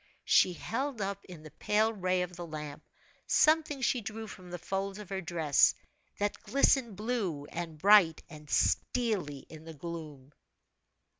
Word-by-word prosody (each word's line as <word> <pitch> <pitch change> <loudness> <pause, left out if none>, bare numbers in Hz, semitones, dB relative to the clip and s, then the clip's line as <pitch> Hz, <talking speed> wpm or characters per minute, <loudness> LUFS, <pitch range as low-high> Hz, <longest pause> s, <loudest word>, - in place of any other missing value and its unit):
She 180 - +5
held 255 - -3
up 200 0 -3
in 175 -4 -11
the 155 - -11
pale 215 +8 +1
ray 185 -2 0
of 180 0 -7
the 175 -1 -7
lamp, 150 -2 -7 0.5
something 310 -3 +3
she 245 -1 +1
drew 220 +1 -6
from 185 -3 -11
the 175 - -5
folds 195 +3 -3
of 210 -3 -10
her 195 -1 -3
dress, 165 -5 +3 0.4
that 205 0 -2
glistened 265 -5 +2
blue, 205 -9 -2
and 165 -2 -5
bright, 190 -2 +5
and 150 -1 -13
steelly 195 - 0
in 155 -1 -12
the 160 0 -10
gloom. 150 -4 -8
185 Hz, 155 wpm, -31 LUFS, 160-215 Hz, 0.5 s, She